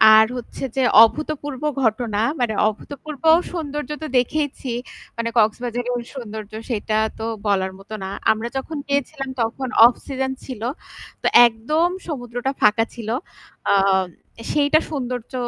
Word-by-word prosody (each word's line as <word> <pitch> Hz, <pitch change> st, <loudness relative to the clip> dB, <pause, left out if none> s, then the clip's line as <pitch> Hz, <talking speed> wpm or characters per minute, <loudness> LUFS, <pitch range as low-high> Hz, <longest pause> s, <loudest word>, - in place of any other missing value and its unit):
আর 220 Hz, 0 st, +8 dB
হচ্ছে 245 Hz, -, -8 dB
যে 265 Hz, -, +2 dB, 0.2 s
অভূতপূর্ব 290 Hz, +2 st, -1 dB, 0.2 s
ঘটনা, 220 Hz, -2 st, +1 dB, 0.2 s
মানে 235 Hz, -3 st, +1 dB
অভূতপূর্ব 285 Hz, +7 st, -6 dB, 0.3 s
সৌন্দর্য 295 Hz, -5 st, -4 dB
তো -, -, -3 dB
দেখেইছি। 270 Hz, 0 st, -1 dB, 0.5 s
মানে 230 Hz, 0 st, -1 dB
কক্সবাজারের 240 Hz, +2 st, 0 dB
সৌন্দর্য 220 Hz, -4 st, -7 dB, 0.2 s
সেটা 215 Hz, -2 st, -1 dB, 0.2 s
তো 220 Hz, -, -3 dB, 0.2 s
বলার 190 Hz, -2 st, +1 dB
মতো 195 Hz, +2 st, -11 dB
না। 190 Hz, -, -4 dB, 0.2 s
আমরা 220 Hz, +2 st, -2 dB
যখন 300 Hz, +4 st, -4 dB
গিয়েছিলাম 280 Hz, 0 st, -2 dB
তখন 230 Hz, +4 st, -2 dB, 0.2 s
অফ 240 Hz, -, +6 dB
সিজন 265 Hz, -1 st, -2 dB
ছিল। 250 Hz, -5 st, -7 dB, 0.6 s
তো -, -, +1 dB, 0.2 s
একদম 300 Hz, +10 st, 0 dB, 0.2 s
সমুদ্রটা 245 Hz, -3 st, -3 dB
ফাঁকা 215 Hz, +1 st, +4 dB
ছিল। 225 Hz, -2 st, -6 dB, 0.6 s
আ -, -, +5 dB, 0.8 s
সেইটা 295 Hz, +1 st, +4 dB
সৌন্দর্য 250 Hz, -4 st, -4 dB
245 Hz, 130 wpm, -22 LUFS, 220-285 Hz, 0.8 s, আর